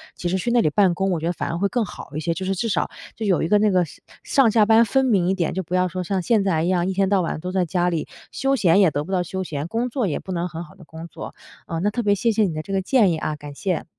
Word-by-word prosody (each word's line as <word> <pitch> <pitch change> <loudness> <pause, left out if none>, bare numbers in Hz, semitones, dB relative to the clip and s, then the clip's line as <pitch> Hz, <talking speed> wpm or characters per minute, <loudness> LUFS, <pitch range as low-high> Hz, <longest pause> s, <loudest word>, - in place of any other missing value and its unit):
其 175 - -3
实 190 - 0
去 235 +6 -2
那 235 -1 +4
里 155 - +2
办 190 +2 +3
公， 195 +2 -1
我 170 - 0
觉 160 - -5
得 175 - 0
反 - - -4
而 170 - -2
会 200 - +1
更 240 -2 0
好 175 - -9
一 155 - -1
些。 165 +1 -1
就 190 - -4
是 195 - 0
至 225 +5 -2
少 - - 0 0.3
就 225 - -4
有 190 -4 +2
一 160 - 0
个 210 - +4
那 210 -1 +3
个 180 -1 +3
是 - - -16 0.2
上 265 -6 +3
下 215 -1 +4
班 225 +1 +6
分 265 +5 +2
明 195 -8 +2
一 190 - +2
点， 175 -4 -1
就 190 - -2
不 180 - -8
要 185 0 +2
说 185 +1 -4
像 190 +1 -1
现 215 +2 +2
在 170 -5 +1
一 - - 0
样， 180 -1 +1
一 190 - -1
天 195 0 +1
到 195 -2 +3
晚 165 - -3
都 180 +3 -5
在 185 -1 +1
家 175 +1 0
里， 165 -3 -2 0.2
休 270 0 0
闲 185 -6 +4
也 180 - +5
得 145 0 -2
不 190 - -8
到 180 -1 +1
休 190 +2 -4
闲， 150 -3 -4
工 230 +6 -1
作 240 -4 -1
也 150 - -2
不 190 - -8
能 175 +1 -1
很 165 +1 -6
好 155 - -15
地 - - -15
工 160 +2 -10
作。 - - -9 0.3
呃， 165 - -3
那 200 +5 +1
特 235 +3 -3
别 205 -1 +3
谢 230 +4 +1
谢 220 - +2
你 185 -5 0
的 155 - -3
这 195 - -7
个 190 - +1
建 210 -3 +3
议 160 - -1
啊， 155 -1 -3
感 145 -1 -10
谢。 180 +4 -2
185 Hz, 365 characters per minute, -22 LUFS, 170-205 Hz, 0.3 s, 班